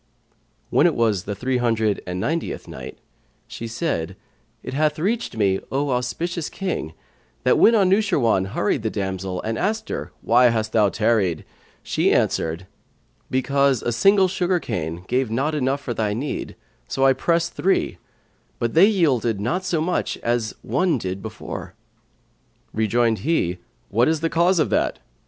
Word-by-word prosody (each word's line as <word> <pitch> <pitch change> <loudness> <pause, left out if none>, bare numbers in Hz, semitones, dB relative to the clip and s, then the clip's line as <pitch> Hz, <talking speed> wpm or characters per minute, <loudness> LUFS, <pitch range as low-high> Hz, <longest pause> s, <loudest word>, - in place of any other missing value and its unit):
When - - +5
it - - 0
was 110 -5 +1
the 100 - -3
Three 125 +5 -1
hundred 110 -4 +1
and 90 0 -3
Ninetieth 165 - -2
Night - - -8 0.5
She 115 - -7
said, 115 - -2 0.5
It - - -6
hath 150 +1 +1
reached 205 - -1
me, 95 -3 +2
O 140 +1 0
auspicious 150 +7 -2
King, 180 - -4 0.5
that - - +3
when 230 - +6
Anushirwan 190 - +3
hurried 105 +2 0
the 110 - -1
damsel 95 -2 -3
and 110 +1 -2
asked 220 +3 -1
her, - - -4
"Why 120 +2 +5
hast 110 -2 +2
thou 105 -3 +4
tarried?" 105 -6 +1 0.4
she - - +1
answered, 80 +3 0 0.6
"Because 140 0 +2
a 120 - 0
single 195 - +4
sugar 180 0 0
cane 85 - -4
gave 130 -1 0
not 135 +7 0
enough 140 -1 0
for 125 - -3
thy 105 -2 -1
need; 135 +6 -4 0.3
so 135 - +1
I 135 - +6
pressed 170 +5 0
three; 190 +1 0 0.6
but 115 -1 -2
they 180 +5 +7
yielded 130 - +1
not 120 - -1
to 170 -4 0
much 175 +3 -1
as 115 -2 -1
one 145 - +1
did 95 -3 -4
before." 110 -1 -7 1.0
Rejoined 110 +1 +1
he, 95 - 0 0.3
"What 115 +4 +3
is 160 -1 +1
the 165 - 0
cause 175 +3 +3
of 155 - +1
that?" - - +1
125 Hz, 155 wpm, -22 LUFS, 110-165 Hz, 1.0 s, they